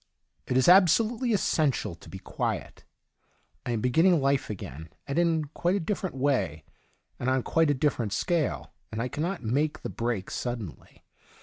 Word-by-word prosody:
— - - -47
It 125 - +1
is 130 - +3
absolutely 215 - +5
essen 160 -7 +2
tial 125 - -3
to - - -14
be 95 - -7
quiet. - - -4 0.8
I - - 0
am 110 - -1
beginning 165 - +4
life 140 0 +1
again, 80 -6 -7 0.2
and 140 +4 -1
in 165 -3 +2
quite 175 +2 +1
a - - +1
different 190 -2 -3
way, 130 - 0 0.6
and 125 - -1
on 130 -1 +1
quite 165 -2 +2
a 145 - +3
different 125 -6 0
scale, 135 - -1 0.2
and 110 - -4
I 120 - -1
cannot 170 +3 -3
make 145 +7 0
the - - -3
break 115 -5 -3
sud 120 -1 -3
denly. 95 -9 -11
140 Hz, 180 wpm, -27 LUFS, 115-170 Hz, 0.8 s, absolutely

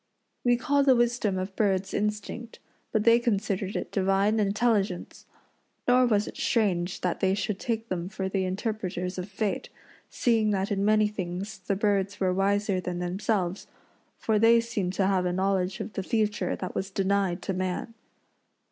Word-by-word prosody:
We 245 -1 +4
call 285 +1 +2
the 265 -2 +5
wisdom 240 -5 +1
of 185 +1 -4
birds 195 -2 +1
instinct, 210 +3 -3 0.3
but 215 -2 +1
they 230 +1 +6
considered 205 -4 -1
it - - -3
divine 195 +2 +2
intelligence. 205 -3 0 0.6
Nor 250 0 +5
was 210 -2 +2
it - - -8
strange 190 -7 0
that 180 -2 -1
they 190 0 +2
should 205 -1 -2
take 230 -1 -2
them 180 -2 -3
for 195 -2 -3
the 190 0 -1
interpreters 185 -2 -3
of 180 +2 -5
fate, 205 +1 -2 0.4
seeing 225 -3 +2
that 195 -1 0
in 200 -1 0
many 215 0 +4
things 195 0 -5
the 190 +1 -2
birds 200 -1 0
were 185 -1 +2
wiser 195 0 +1
than 180 -1 -4
themselves, 185 +1 -1 0.5
for 220 -2 +1
they 230 +2 +6
seemed 215 -6 -2
to 195 - +1
have 190 -2 +2
a - - 0
knowledge 190 0 0
of 215 - -5
the - - -2
future 210 +1 0
that 185 - -5
was 190 - -3
denied 195 -2 0
to 195 - -2
man. 185 +5 -3
200 Hz, 170 wpm, -27 LUFS, 190-215 Hz, 0.6 s, they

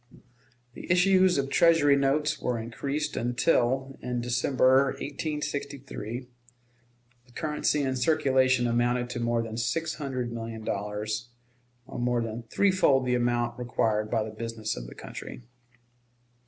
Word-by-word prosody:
The - - -6
issues 185 0 +4
of 135 -1 0
Treasury 165 -4 +5
notes 140 +2 +1
were 125 -1 -1
increased 140 +6 -3
until, 125 +2 +1
in 125 -1 -2
December, 130 +2 +3
1863, 140 -5 -4 1.0
the - - -21
currency 150 0 0
in 130 -1 -1
circulation 130 -2 +3
amounted 120 +1 +1
to 120 - -4
more 120 0 0
than 110 0 -6
six 135 +9 -1
hundred 130 -5 -3
million 115 -1 -6
dollars, 105 +3 -3 0.6
or - - -7
more 120 -1 +1
than 115 +1 -5
threefold 185 -10 +3
the 125 - +1
amount 120 0 0
required 110 -3 0
by 110 -1 +1
the 110 - -6
business 110 0 -4
of - - -7
the - - -11
country. - - -9
125 Hz, 130 wpm, -27 LUFS, 115-140 Hz, 1.0 s, Treasury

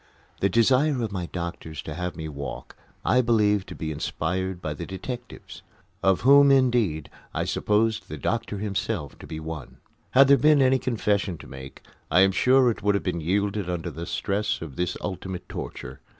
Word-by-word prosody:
The 100 - +2
desire 130 +6 +3
of 110 - -3
the 90 -3 -4
doctors 85 -3 -5
to 75 - -6
have 90 +3 -4
me 80 -1 -5
walk 70 -2 -7 0.3
I 125 - +4
believed 105 -4 +2
to - - -7
be 80 -1 -4
inspired 95 +4 -2
by 75 -4 -4
the 75 - -7
detectives, 120 +6 -7 0.4
of 95 -1 +3
whom, 140 +2 +7
indeed, 120 - +2 0.3
I - - 0
supposed 110 +1 0
the - - -5
doctor 115 -3 -2
himself 100 - -3
to - - -11
be 80 - -6
one. 80 -3 -7 0.3
Had 135 +1 +6
there 140 0 +7
been 150 0 +5
any 130 0 +4
confession 105 -7 0
to - - -12
make, 65 0 -10 0.3
I 90 - +5
am 95 0 +5
sure 125 +5 +4
it 110 - -7
would 100 0 +2
have 100 - -1
been 85 -3 -2
yielded 100 +3 0
under 90 -2 -3
the 85 +1 -7
stress 105 +1 -1
of 75 -5 -8
this 90 +3 -2
ultimate 95 0 -5
torture. 65 +2 -7
100 Hz, 185 wpm, -25 LUFS, 85-115 Hz, 0.4 s, whom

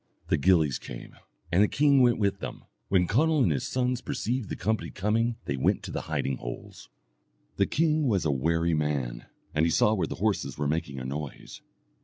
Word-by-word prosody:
The - - +3
gillies 80 -3 +3
came, - - -9 0.4
and 90 +3 +4
the 105 - +5
king 140 +1 +4
went 120 -2 +4
with 100 -2 0
them. - - -7 0.2
When 90 -2 +3
Conall 150 - +3
and 90 - +3
his 70 -4 -1
sons 125 -1 0
perceived 120 -3 -2
the - - -3
company 110 +4 -1
coming 115 +4 0
they 70 - -2
went 65 - +1
to - - -6
the - - -3
hiding 65 -1 -1
holes. - - -8 0.7
The - - +3
king 155 -2 +1
was 100 -8 +1
a 75 - +2
wary 80 +5 +1
man, 70 -6 -2 0.3
and 75 - +2
he 85 - +3
saw 105 +6 +3
where 100 - 0
the - - -5
horses 105 0 -1
were 75 -1 -1
making 70 -2 -2
a 65 - -5
noise. 70 +2 -6
95 Hz, 200 wpm, -27 LUFS, 75-120 Hz, 0.7 s, the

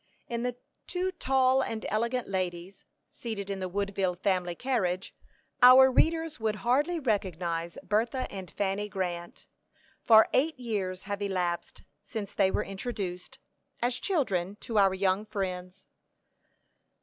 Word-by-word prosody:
In 235 0 -3
the 245 0 -2 0.3
two 370 +1 -1
tall 265 -5 +2
and 225 -4 -3
elegant 235 +3 -1
ladies, 185 -1 -4 0.3
seated 200 -4 -5
in 195 - -3
the 185 -1 -3
Woodville 195 -1 -1
family 180 -1 0
carriage, 190 -7 -1 0.5
our 260 +1 +9
readers 320 +1 +2
would 220 -1 0
hardly 285 - +1
recognize 175 - -2
Bertha 230 +5 0
and 190 -2 -7
Fanny 205 +1 -2
Grant, 175 -3 -4 0.6
for 220 -1 +7
eight 290 +1 +2
years 195 -6 -3
have 205 0 -4
elapsed 180 -3 -2 0.2
since 210 -4 -6
they 195 -2 +3
were - - 0
introduced, 195 -3 -5 0.4
as 245 +1 0
children, 205 - 0
to 225 -3 0
our 195 -1 +4
young 190 +1 +1
friends. 185 -2 -5
200 Hz, 130 wpm, -29 LUFS, 185-245 Hz, 0.6 s, our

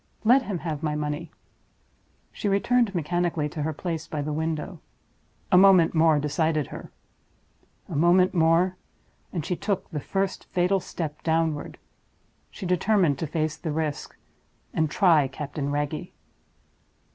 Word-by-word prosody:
Let 245 +5 +6
him 205 -7 -3
have 160 -3 -4
my 150 -2 -1
money!" 150 +2 -3 1.0
She 205 - -3
returned 210 +1 +2
mechanically 170 -1 0
to 150 - -5
her 155 +2 -1
place 165 +1 -4
by 150 -2 -3
the 150 +1 -3
window. 160 +2 -3 0.7
A 180 - +7
moment 190 -4 +6
more 160 -2 +4
decided 150 +1 0
her. - - -8 1.0
A - - -6
moment 175 +4 +4
more, 170 +2 +3 0.5
and 165 -6 -3
she 180 - -1
took 195 +1 -2
the 150 - -3
first 195 +6 -2
fatal 185 +1 +1
step 155 -4 -6
downward 160 -2 -1 0.7
she - - -8
determined 180 -4 +2
to 160 - -2
face 155 0 -1
the 160 -1 -4
risk, 150 -1 -3 0.6
and 160 -1 +1
try 160 -5 +4
Captain 140 +1 -5
Wragge. 145 +1 -3
160 Hz, 140 wpm, -25 LUFS, 150-180 Hz, 1.0 s, A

